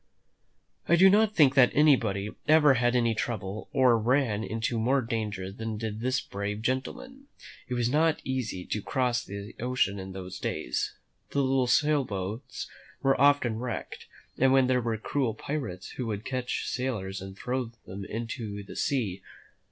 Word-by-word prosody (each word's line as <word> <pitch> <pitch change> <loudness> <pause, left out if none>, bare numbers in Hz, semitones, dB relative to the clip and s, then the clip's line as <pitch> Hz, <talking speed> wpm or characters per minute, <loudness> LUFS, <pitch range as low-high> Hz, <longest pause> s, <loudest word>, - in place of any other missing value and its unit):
I 170 - +7
do 190 +2 +7
not 215 +1 +3
think 140 -4 +6
that 130 -3 +6
anybody 110 -9 +3 0.2
ever 150 -2 +6
had 120 0 +2
more 115 -2 +3
trouble 105 -2 -4
or 125 -4 +4
ran 115 -2 +1
into 115 +4 -2
more 130 +4 +2
danger 105 -5 -3
than 110 +1 -5
did 110 -1 -4
this 130 +2 0
brave 100 +2 -4
gentleman. 195 - -3 0.4
It 125 - -2
was 120 -1 +1
not 155 +4 +2
easy 125 -8 -3
to 105 - -2
cross 125 +1 0
the 100 +2 -8
ocean 120 -5 0
in 95 0 -7
those 95 -1 -7
days. - - -2 0.3
The 140 - +1
little 130 -1 +2
sail 145 +3 +3
boats 100 +1 -5 0.4
were 135 -1 +3
often 140 -6 +4
wrecked, 120 -2 -5 0.3
and 135 +1 +5
then 135 -1 +5
there 125 0 +2
were 115 -1 -1
cruel 115 0 -1
pirates 110 -11 -5
who 125 - -4
would 105 -1 -4
catch 130 -2 -2
sailors 105 -7 -3
and 95 0 -9
throw 125 +3 -2 0.2
them 95 +2 -7
into 110 -2 -5
the 100 - -11
sea. 105 -9 -1
120 Hz, 165 wpm, -28 LUFS, 105-130 Hz, 0.4 s, I